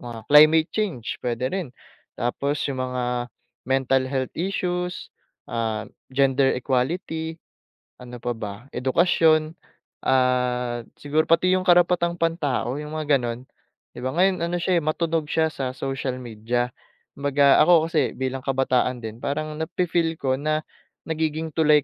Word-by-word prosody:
mga 115 -2 -8
climate 155 +2 +7
change, 180 - -3
puwede 120 +1 -2
rin. 185 -6 -2 0.5
Tapos 140 +4 -1
'yong 135 -2 -3
mga 125 -1 -2 0.6
mental 135 0 +2
health 130 -2 -2
issues, 180 -1 -3 0.3
ah, 110 -2 -2 0.2
gender 135 0 +3
equality, 160 +5 -2 0.6
ano 125 0 -9
pa 120 - -1
ba? 105 -3 -5 0.2
Edukasyon, 155 +3 +3 0.6
ah, 125 -2 +1
siguro 150 +2 0
pati 170 +3 +4
'yong 185 0 +1
karapatang 175 -1 +4
pantao, 150 -6 -1
'yong 150 +1 -6
mga 150 -3 +2
gano'n. 120 0 -4 0.5
'Di - - -10
ba, 130 +4 -3
ngayon 185 +1 +3
ano 175 - -2
siya 180 -1 +3
eh, - - -7
matunog 160 0 -1
siya 160 +1 +1
sa 130 -3 -4
social 135 -1 -3
media. 120 +2 -2 0.5
Kumbaga, 140 0 +4
ako 165 -2 +5
kasi 140 -8 +1
bilang 130 0 -2
kabataan 130 -2 0
din, 110 +1 -7
parang 155 +3 -3
na-fe-feel 165 0 0
ko 130 -3 -1
na, 155 +1 0 0.4
nagiging 160 0 -2
tulay 150 -2 +4
145 Hz, 135 wpm, -24 LUFS, 125-160 Hz, 0.6 s, climate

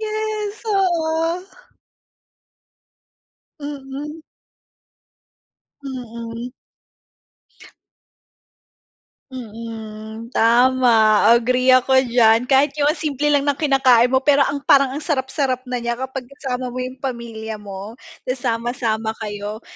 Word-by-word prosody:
Yes, 430 -1 -3
oo. 340 -3 0 2.2
Mm. 290 +2 -7 1.6
Mm. 235 -2 -7 2.8
Mm. 225 -1 -8
Tama, 235 -2 +4 0.2
agree 255 +2 +1
ako 260 +1 +5
diyan. 235 -1 +3
Kahit 275 +1 +4
yung 290 - +4
ang 310 - -1
simple 295 -1 -1
lang 285 -1 +2
ng 285 - +2
kinakain 260 -5 +4
mo 260 0 +1
pero 285 -1 +5
ang 285 +1 +1
parang 275 -1 +5
ang 265 - -5
sarap-sarap 265 -3 -1
na 250 - -1
niya 235 0 -2
kapag 260 +1 -6
kasama 250 -2 -5
mo 255 - -3
yung 255 +1 -6
pamilya 230 -4 -6
mo 200 +2 -8 0.3
tapos 255 0 -3
sasama-sama 230 -2 -1
kayo. 210 +1 -5
255 Hz, 100 wpm, -20 LUFS, 230-280 Hz, 2.8 s, ako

